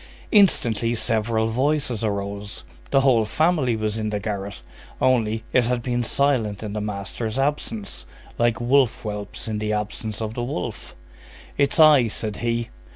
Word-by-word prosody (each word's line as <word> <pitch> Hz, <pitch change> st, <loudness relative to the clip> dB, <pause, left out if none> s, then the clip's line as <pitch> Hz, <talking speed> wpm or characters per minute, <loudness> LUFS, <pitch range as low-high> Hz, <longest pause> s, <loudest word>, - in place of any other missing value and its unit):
Instantly, 120 Hz, -, +3 dB
several 110 Hz, -1 st, 0 dB
voices 130 Hz, -1 st, 0 dB
arose. 100 Hz, -1 st, -3 dB, 0.3 s
The 135 Hz, -, +4 dB
whole 130 Hz, -4 st, +4 dB
family 150 Hz, +1 st, +1 dB
was 110 Hz, 0 st, -2 dB
in 110 Hz, -1 st, -1 dB
the 105 Hz, -1 st, -2 dB
garret. 100 Hz, -, -5 dB, 0.4 s
Only, 115 Hz, -3 st, +2 dB
it 125 Hz, -2 st, +4 dB
had 120 Hz, 0 st, -1 dB
been 120 Hz, -1 st, 0 dB
silent 115 Hz, -6 st, 0 dB
in 105 Hz, -1 st, -5 dB
the 105 Hz, -, -2 dB
master's 105 Hz, +3 st, -4 dB
absence, 135 Hz, -7 st, -2 dB, 0.3 s
like 120 Hz, -2 st, +2 dB
wolf 125 Hz, 0 st, +2 dB
whelps 105 Hz, -1 st, -6 dB
in 110 Hz, -1 st, -2 dB
the 105 Hz, 0 st, -1 dB
absence 105 Hz, 0 st, -3 dB
of 110 Hz, -1 st, -3 dB
the 120 Hz, -, -4 dB
wolf. 120 Hz, -8 st, -5 dB, 0.6 s
"It's 140 Hz, +3 st, +1 dB
I," 150 Hz, -6 st, +7 dB
said 105 Hz, -1 st, -3 dB
he. 120 Hz, 0 st, -1 dB
115 Hz, 155 wpm, -23 LUFS, 105-125 Hz, 0.6 s, I